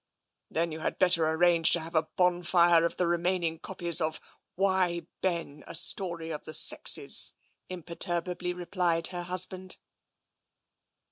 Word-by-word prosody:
" - - -55
Then 165 +1 -2
you 155 - -7
had - - -4
better 170 -3 +3
arrange 165 0 +3
to 170 - +3
have 165 +1 -8
a 160 -1 0
bonfire 175 -1 +3
of - - -9
the 180 - -1
remaining 170 -1 -1
copies 175 -3 +1
of 155 0 -2 0.2
' - - -54
Why, 185 -3 0 0.2
Ben! 170 -5 -3
A - - -7
Story 170 -1 0
of 150 - -7
the 155 - -3
Sexes,' - - +3 0.2
" - - -48
imperturbably 175 0 -2
replied 175 -1 -2
her 175 -1 -5
husband. 185 +1 0
175 Hz, 150 wpm, -28 LUFS, 165-180 Hz, 0.2 s, better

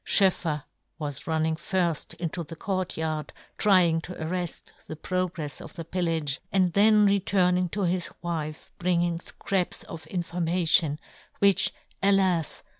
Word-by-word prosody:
SchoefFer 170 -6 +3 0.3
was 145 -4 -4
running 160 0 +1
firft 170 0 -1
into 170 0 -3
the 165 +1 -9
court 185 +1 -2
yard, 155 -1 -2 0.3
trying 180 -6 +4
to 180 - -7
arreft 175 +1 -4 0.2
the 155 - -6
progrefs 175 -3 -3
of - - -10
the 165 -3 -6
pillage, 165 -5 -1
and 185 -3 +2
then 210 +1 +6
returning 185 -2 +2
to 200 +3 -2
his 180 0 0
wife 155 -3 -4
bringing 175 -1 +1
fcraps 190 +1 -2
of 165 -1 -9
information, 170 -3 +1 0.4
which, 195 -2 +5 0.3
alas 190 -5 +2
175 Hz, 130 wpm, -27 LUFS, 160-185 Hz, 0.4 s, then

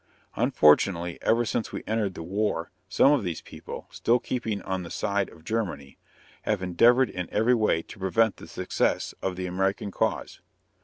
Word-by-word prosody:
Unfortunately, 85 +3 +3
ever 120 +1 +2
since 115 - -2
we - - -5
entered 105 -4 -1
the - - -6
war 95 -2 -1 0.2
some 140 - +5
of 145 -7 +2
these 85 -4 -3
people, - - -9
still 120 +2 +2
keeping 115 -4 -3
on 95 -1 -2
the 85 - -8
side 100 +2 -1
of 80 - -17
Germany, 90 -12 -3 0.4
have 105 -3 -1
endeavored 120 +8 +4
in 90 -2 -5
every 110 +4 +3
way 110 -8 +2
to - - -13
prevent 100 +3 +2
the - - -11
success - - -1
of 95 -1 -2
the 90 0 -4
American 95 +3 -1
cause. - - -2
100 Hz, 170 wpm, -26 LUFS, 90-115 Hz, 0.4 s, some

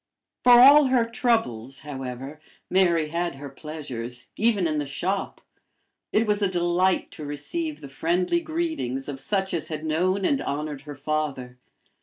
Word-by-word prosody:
For 245 - +8
all 275 +4 +9
her 255 -3 +3
troubles, 220 - -1
however, 135 0 -7 0.3
Mary 170 -4 +3
had 170 -1 -2
her 140 +1 -8
pleasures, 125 -5 -6
even 215 -4 +2
in 155 -2 0
the 145 - -2
shop. 185 +7 -3 0.7
It 220 - +3
was 210 -1 +1
a 200 - +3
delight 180 +1 +1
to 155 - -9
receive 290 - -4
the - - -8
friendly 175 - 0
greetings 320 - -3
of 140 -2 -5
such 190 +6 -1
as 165 -3 -1
had 155 -1 -5
known 185 +5 +1
and 280 -2 +2
honored 145 -1 -3
her 145 - -6
father. 135 -4 -3
165 Hz, 155 wpm, -25 LUFS, 140-205 Hz, 0.7 s, all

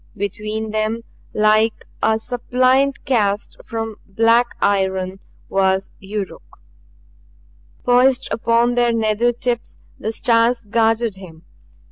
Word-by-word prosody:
Between 215 +2 -3
them, 215 +2 -1 0.3
like 215 +1 +2 0.2
a 220 0 +3
suppliant 255 +3 +1
cast 210 -6 0
from 225 -1 -5
black 230 +4 +2
iron, 190 -1 0 0.3
was 190 0 +1
Yuruk. 195 0 -5 1.4
Poised 255 +1 +3
upon 235 +1 +2
their 240 -1 +2
nether 225 +1 +2
tips 240 0 -3 0.2
the 220 - -2
stars 230 +1 +2
guarded 225 -1 +1
him. 170 -4 -12
225 Hz, 100 wpm, -20 LUFS, 205-240 Hz, 1.4 s, a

